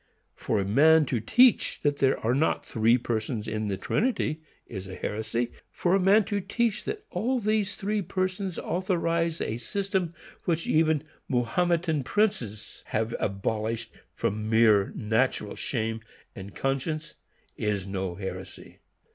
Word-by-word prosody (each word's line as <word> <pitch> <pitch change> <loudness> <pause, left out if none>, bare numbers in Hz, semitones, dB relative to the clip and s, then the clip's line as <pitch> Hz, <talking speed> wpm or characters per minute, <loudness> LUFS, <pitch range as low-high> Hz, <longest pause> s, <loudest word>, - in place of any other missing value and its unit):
For 110 - -1
a 100 - 0
man 155 +9 +5
to 125 -3 -1
teach 245 - +4
that 145 -1 +2
there 135 -1 +3
are 115 +2 +1
not 145 +5 +1
three 115 +2 +3
persons 115 -2 -2
in 110 0 -2
the 100 -2 -1
Trinity 185 - 0 0.2
is 95 -3 -7
heresy. 110 +5 -2 0.2
For 175 - 0
a 195 - +5
man 200 +3 +5
to 205 -2 -1
teach 220 +3 -1
that 425 0 -4
all 240 +8 0
these 215 -2 0
three 210 +1 -1
Persons 185 0 -2
authorize 170 -2 0
a 110 - -2
system 185 - -2 0.3
which 165 -1 0
even 155 -1 +2 0.3
Mahometan 160 +5 +1
princes 125 - -1
have 110 +1 -1
abolished 110 +3 -2 0.2
from 110 +1 -2
mere 110 -3 +5
natural 110 -1 0
shame 115 -2 -2 0.4
and 95 0 -9
conscience, 140 +4 -2 0.4
is 105 -3 -1
no 95 -2 -3
heresy! 95 +1 -8
135 Hz, 140 wpm, -27 LUFS, -, 0.4 s, man